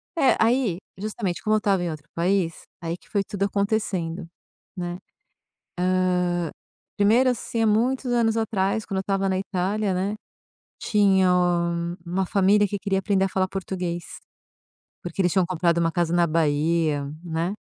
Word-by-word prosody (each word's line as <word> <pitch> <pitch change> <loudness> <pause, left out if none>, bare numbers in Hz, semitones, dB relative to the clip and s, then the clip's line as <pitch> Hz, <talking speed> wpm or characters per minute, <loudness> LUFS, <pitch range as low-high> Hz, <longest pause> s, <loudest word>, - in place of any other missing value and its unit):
É, 275 -5 +4
aí, 230 -5 +2 0.2
justamente, 200 -3 -3
como 215 -1 +2
eu - - +4
estava 200 -3 +1
em 175 - -1
outro 150 -1 -8
país, 175 -1 +1 0.3
aí 165 0 -3
que - - -20
foi 200 -2 +1
tudo 200 0 -2
acontecendo, 200 -5 -1 0.5
né, 175 0 -4 1.3
hã, 175 -2 -1 0.5
1º 230 +6 +4
assim, 230 0 -3
há 225 - +3
muitos 245 +4 +1
anos 230 -1 +2
atrás, 210 -1 0
quando 195 - -2
eu - - 0
estava 195 0 0
na 190 -1 +1
Itália, 195 +1 -1
né, 195 +3 -1 0.6
tinha 195 -3 +3 0.8
uma 185 +2 -1
família 200 +2 +3
que 200 0 -3
queria 195 0 0
aprender 195 -1 +1
a 195 - -2
falar 185 0 0
português, 180 -3 -4 1.0
porque 175 +2 -2
eles 175 -2 +2
tinham 190 -3 +3
comprado 170 -1 +1
uma 165 -1 +2
casa 175 -1 0
na 175 0 +4
Bahia, 155 -1 +1 0.2
né. 170 +3 -2
190 Hz, 155 wpm, -24 LUFS, 175-205 Hz, 1.3 s, É